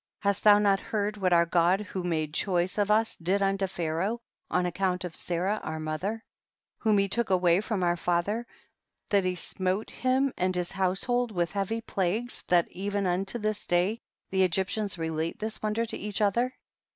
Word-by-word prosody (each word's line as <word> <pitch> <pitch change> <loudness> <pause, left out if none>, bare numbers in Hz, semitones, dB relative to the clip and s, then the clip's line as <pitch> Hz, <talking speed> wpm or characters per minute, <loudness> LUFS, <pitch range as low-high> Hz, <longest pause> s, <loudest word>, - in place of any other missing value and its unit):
7. 200 - +2
Hast 200 - -1
thou 210 -1 +8
not 200 -2 +3
heard 210 0 -2
what 190 -3 0
our 170 -1 +5
God 175 +3 +3
who 190 -2 -5
made 160 -4 -1
choice 180 +2 0
of 205 0 +2
us 220 +2 +3
did 185 +4 0
unto 195 0 +1
Pharaoh 175 +6 -2 0.3
on 180 0 +1
account 180 +1 -1
of 175 -3 -6
Sarah 185 +5 0
our 160 0 -4
mother, 155 +9 -3 0.6
whom 215 -2 +3
he 200 0 +3
took 235 +3 -1
away 180 -1 +4
from 210 -3 -2
our 175 0 +2
father, 180 +7 -1 0.6
that 200 -2 +3
he 185 0 0
smote 185 +3 -2
him 260 +1 +1
and 185 0 0
his 180 -1 -1
household 195 +6 0
with 175 -4 -1
heavy 205 +3 -2
plagues, 215 +4 -1
that 175 -1 +4
even 200 +1 -2
unto 190 +5 0
this 215 -2 -2
day 180 +6 +1 0.3
the 190 - 0
Egyp 190 +1 +2
tians 205 -4 -1
relate 160 +1 -2
this 220 0 -4
wonder 215 +2 0
to - - -6
each 210 0 -2
other 235 +5 +2
195 Hz, 190 wpm, -28 LUFS, 175-210 Hz, 0.6 s, thou